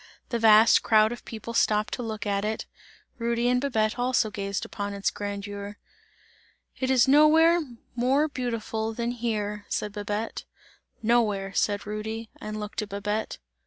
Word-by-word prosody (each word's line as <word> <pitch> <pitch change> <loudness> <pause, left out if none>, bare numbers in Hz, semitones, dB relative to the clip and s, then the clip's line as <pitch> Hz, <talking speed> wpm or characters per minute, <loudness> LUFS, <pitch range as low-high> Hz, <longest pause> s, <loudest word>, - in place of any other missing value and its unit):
The 235 - -1
vast 220 0 +7
crowd 215 0 +4
of 240 - -8
people 230 +1 -7
stopped 215 -2 +2
to - - -3
look 220 -3 -4
at 200 -1 0
it, 215 +1 -2 0.5
Rudy 235 +1 0
and 250 0 +2
Babette 225 -4 0
also 245 -3 +1
gazed 200 -1 -3
upon 200 -1 -5
its 200 - 0
grandeur. 205 0 -6 1.0
"It 260 - -1
is 260 -1 +4
nowhere 320 +4 +6 0.3
more 265 +5 +2
beautiful 230 -4 -3
than 235 +1 -1
here!" 210 -4 -3
said 210 - -2
Babette. 210 +2 -4 0.6
"Nowhere!" 210 -4 +1
said 205 0 0
Rudy, 220 +2 -5
and 215 0 -5
looked 210 0 -4
at 210 - -6
Babette. 205 +2 -3
220 Hz, 150 wpm, -26 LUFS, 205-240 Hz, 1.0 s, vast